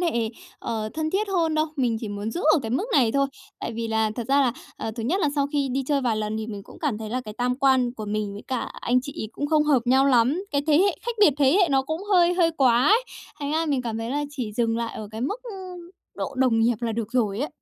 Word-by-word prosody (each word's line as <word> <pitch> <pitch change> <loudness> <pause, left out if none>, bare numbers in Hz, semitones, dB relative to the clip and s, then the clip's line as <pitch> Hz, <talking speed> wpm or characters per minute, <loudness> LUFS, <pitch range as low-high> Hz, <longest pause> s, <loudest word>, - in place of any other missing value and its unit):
hệ, 235 -11 0 0.3
ờ, 220 -2 -3
thân 315 0 -1
thiết 405 +2 0
hơn 330 -5 +1
đâu, 310 +1 +2
mình 245 -4 +1
chỉ 220 - -5
muốn 205 +2 -4
giữ 345 - -4
ở 320 - +4
cái 225 - -4
mức 265 - 0
này 245 -6 +4
thôi. 275 0 +2 0.3
Tại - - -4
vì 230 0 -3
là 220 -1 +1
thật 240 +1 -5
ra 280 +1 +4
là, 250 -4 +2 0.2
à, 225 - -4
thứ 230 - -3
nhất 340 - 0
là 300 - +2
sau 280 -1 +1
khi 280 -2 +1
đi 270 - 0
chơi 285 -2 +1
vài 235 -4 0
lần 215 0 -2
thì 220 0 -4
mình 205 -3 -6
cũng - - -14
cảm 275 -9 -1
thấy 220 -1 -6
là 255 - -1
cái 215 -4 -9
tam 250 +1 0
quan 260 -3 +3
của 215 -3 -6
mình 210 -1 -2
với 205 - -8
cả 260 - -1 0.2
anh 250 +1 +2
chị 280 +3 -7
ấy 215 - -5
cũng 290 - -3
không 305 0 +3
hợp 285 -5 +3
nhau 265 +2 +4
lắm, 265 +8 +3
cái 285 -3 0
thế 305 0 +5
hệ 395 +2 +3
khách 475 - -3
biệt 380 -7 +7
thế 275 -2 +5
hệ 355 - +4
nó 270 -1 +3
cũng 315 +7 -4
hơi 355 -1 +5
hơi 340 -2 +3
quá 250 0 +4
ấy. 460 +4 +4 0.4
Thành 285 +1 -2
ra 325 +1 +1
mình 275 -4 0
cảm 225 -2 -3
thấy 225 +2 -4
là 290 +1 -1
chỉ 250 -7 -5
dừng 230 0 0
lại 230 -1 -3
ở 215 - -7
cái 220 - -7
mức, 410 - -3
ưm, 370 -6 -9 0.2
độ 275 - -4
đồng 250 -4 +3
nghiệp 235 +1 +3
là 230 -2 -1
được 225 +1 -4
rồi 215 -5 +1
ấy. 295 - -1
260 Hz, 290 wpm, -24 LUFS, 225-305 Hz, 0.4 s, biệt